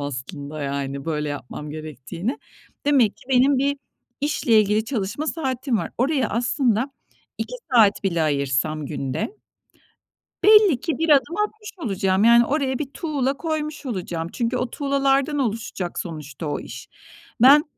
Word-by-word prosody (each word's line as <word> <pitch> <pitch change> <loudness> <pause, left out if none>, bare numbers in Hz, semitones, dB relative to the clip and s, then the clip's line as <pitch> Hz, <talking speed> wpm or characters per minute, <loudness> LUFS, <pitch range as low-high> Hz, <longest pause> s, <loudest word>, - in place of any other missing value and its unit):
aslında, 145 +2 -5
yani, 140 0 -3
böyle 150 -2 -2
yapmam 145 +1 -6
gerektiğini. 155 - -5 0.5
Demek 260 -8 +4
ki - - -19
benim 265 +1 +4
bir 280 +2 +1 0.4
işle 255 -6 +3
ilgili 210 +1 +1
çalışma 225 +4 -3
saatim 265 -5 -1
var. - - -4
Oraya 265 +2 +1
aslında 240 +1 +1 0.5
2 - - -4 0.2
saat 215 -4 +5
bile 170 -4 +1
ayırsam 145 +1 0
günde 135 - -3 1.1
belli 420 - +7
ki 325 +1 -2
bir 325 +1 0
adım 280 +2 +4
atmış 425 0 -12
olacağım, 195 -2 +1
yani, 235 +1 +7
oraya 270 -2 0
bir 285 -2 -4
tuğla 280 -4 -1
koymuş 305 -1 -3
olacağım. 175 -7 -3
Çünkü 240 +1 -1
o 250 -1 -2
tuğlalardan 275 +1 +1
oluşacak 215 -7 -3
sonuçta 155 -3 -6
o 145 - -2
iş. - - -9 0.5
Ben 285 +4 +8
235 Hz, 140 wpm, -23 LUFS, -, 1.1 s, Ben